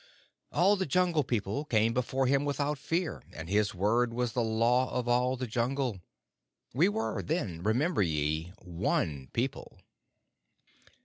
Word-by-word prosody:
All 200 +4 +4
the 190 - -1
Jungle 175 -1 +2
People 115 +1 -2
came 115 -5 +2
before 130 +2 0
him 140 +2 +2
without 145 0 -1
fear, 165 +4 -2
and 80 0 -7
his 100 +1 +1
word 115 +5 +1
was 125 -1 -1
the 125 - +1
Law 115 +3 +2
of 125 -1 -2
all 125 +1 +2
the 130 - -3
Jungle. 120 -1 -1 0.7
We 160 - +4
were 220 +2 -2
then, 105 - -2
remember 125 - +1
ye, 80 0 0
one 85 -6 -1
people. 125 +2 -3
125 Hz, 140 wpm, -30 LUFS, 105-140 Hz, 0.7 s, All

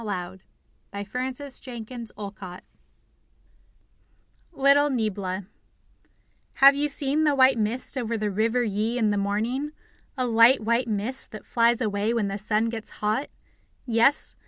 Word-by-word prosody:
Lydia 190 -3 -5 0.7
Maria 255 +1 -1
Child 250 -4 -7
(Adapted) 195 -3 -8 1.9
LITTLE 285 -1 +4
NIEBLA 200 -6 -2 1.1
Have 275 +1 +8
you 290 +1 0
seen 285 +1 -1
the 295 -2 +3
white 260 -2 +5
mist 230 +6 -1
over 235 -3 -2
the 210 -1 -2
River 225 +5 +1
Yi 220 +2 -1
in 220 -3 +2
the 205 - 0
morning 225 +9 -1 0.4
a 255 - 0
light 230 +2 +5
white 235 +3 +1
mist 220 +5 -3
that 215 - -9
flies 235 0 +2
away 210 +1 0
when 210 -4 0
the 195 +1 -4
sun 215 +2 +1
gets 225 -1 -6 0.2
hot? 220 +7 0 0.6
Yes? 235 +4 +2
230 Hz, 135 wpm, -25 LUFS, 210-260 Hz, 1.9 s, Have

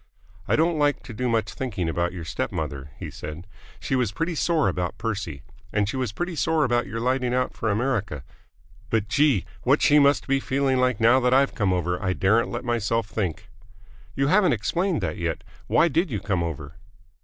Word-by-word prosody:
"I - - +3
don't 160 0 +2
like 145 -1 +1
to 115 - -9
do 125 +3 -1
much 115 -1 0
thinking 100 -10 -3
about 85 +2 0
your 85 -3 -7
step - - -3
mother," 70 0 -4
he - - -7
said. 75 +4 -8 0.3
"She 135 - -1
was 125 -5 +1
pretty 165 - -2
sore 160 -1 +1
about 90 -1 -2
Percy. 100 - -4 0.3
And 105 -1 +1
she 110 - -3
was 130 -5 -1
pretty 175 - -4
sore 160 0 +1
about 120 -4 +1
your 115 +3 -4
lighting 125 +1 0
out 125 0 0
for 110 - -2
America. 105 - -1 0.7
But, 110 -2 0
gee! 135 - +2 0.2
what - - +3
she 150 - +6
must 140 0 +4
be 135 0 +2
feeling 135 0 0
like 125 -3 +1
now 120 +3 +5
that 125 0 +3
I've 135 +1 +3
come 100 -5 +1
over, 90 0 -1
I 95 -2 0
daren't 110 +6 +2
let 120 +1 -5
myself 115 -2 0
think." 95 -7 -3 0.7
"You 135 - +1
haven't 185 +5 +4
explained 175 - 0
that 85 -4 -2
yet. 85 -2 -3 0.2
Why 170 - +4
did 170 +3 +1
you 110 -6 -2
come 95 -4 -1
over?" 80 -1 -5
115 Hz, 200 wpm, -25 LUFS, 95-135 Hz, 0.7 s, she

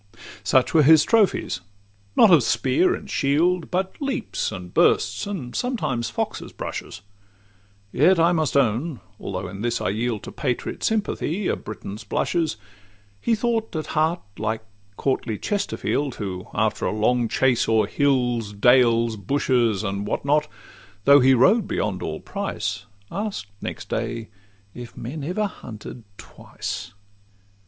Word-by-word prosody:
Such 125 +5 +3
were 160 - +6
his 150 +1 +7
trophies—not 100 - +1
of 165 -5 +7
spear 130 +8 +2
and - - -9
shield, 165 +5 +1
But 190 +6 -2
leaps, 275 - -2
and 90 -3 -8
bursts, - - +2
and 155 -12 -5
sometimes 150 - -1
foxes' 115 - -4
brushes; 100 - -6 0.9
Yet 170 +7 +4
I 165 +1 +5
must 155 -4 +1
own,—although 105 - -2
in 100 +2 -8
this 120 0 0
I - - -1
yield 110 +1 -2
To - - -7
patriot 125 -4 -3
sympathy 205 -4 -1
a - - +1
Briton's 105 0 -8
blushes,— 155 +5 -1 0.6
He 230 - +2
thought 225 -3 -1
at 155 - -2
heart 160 +3 +1 0.2
like 110 +1 -2 0.3
courtly 125 -5 -1
Chesterfield, 150 - -1
Who, 95 -3 -5
after 105 0 0
a - - 0
long 115 +3 +1
chase 130 0 +2
o'er 110 -2 +4
hills, 120 -4 +1
dales, 115 0 +4
bushes, 115 -1 +1
And 100 0 -3
what 110 - -2
not, 150 +1 +2 0.6
though 140 0 +8
he 130 0 +5
rode 195 - +4
beyond - - -2
all - - -4
price, 105 - -4 0.2
Ask'd 205 - -3 0.2
next - - -6
day, 115 -2 -3 0.4
'If 120 -1 -10
men 140 +5 -6
ever 185 +8 -1
hunted 115 - -9
twice? - - -7
125 Hz, 135 wpm, -23 LUFS, 110-165 Hz, 0.9 s, though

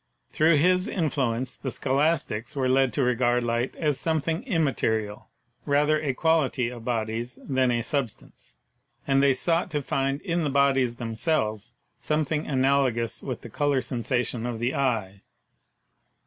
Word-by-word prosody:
Through 160 +1 +4
his 180 +5 +3
in 165 -9 -1
fluence 125 -2 -1
the 135 - -2
Scholastics 140 -2 -1
were 130 -2 0
led 130 0 +3
to 140 - +1
regard 125 0 +2
light 120 +2 -1
as 150 -4 0
some 160 -1 +1
thing 160 +4 -2
immaterial, 115 - -1 0.3
rather 150 +1 +2
a 135 -4 -1
quality 150 -6 +1
of 120 -2 -9
bodies 115 0 -3
than 130 -2 +2
a 120 -1 0
sub 135 0 -1
stance, - - -19 0.5
and 135 0 +3
they 140 -1 +4
sought 170 +7 0
to 150 -3 -2
find 135 +1 -1
in 175 -3 -1
the 150 - 0
bodies 135 -3 +2
themselves 115 -2 -2 0.3
something 155 0 -1
analogous 130 -4 +1
with 130 -4 -5
the 120 - -10
color 145 +1 +1
sensation 120 -1 -2
of 120 -2 -3
the 120 +3 -1
eye. 110 -8 -1
135 Hz, 155 wpm, -26 LUFS, 120-150 Hz, 0.5 s, Through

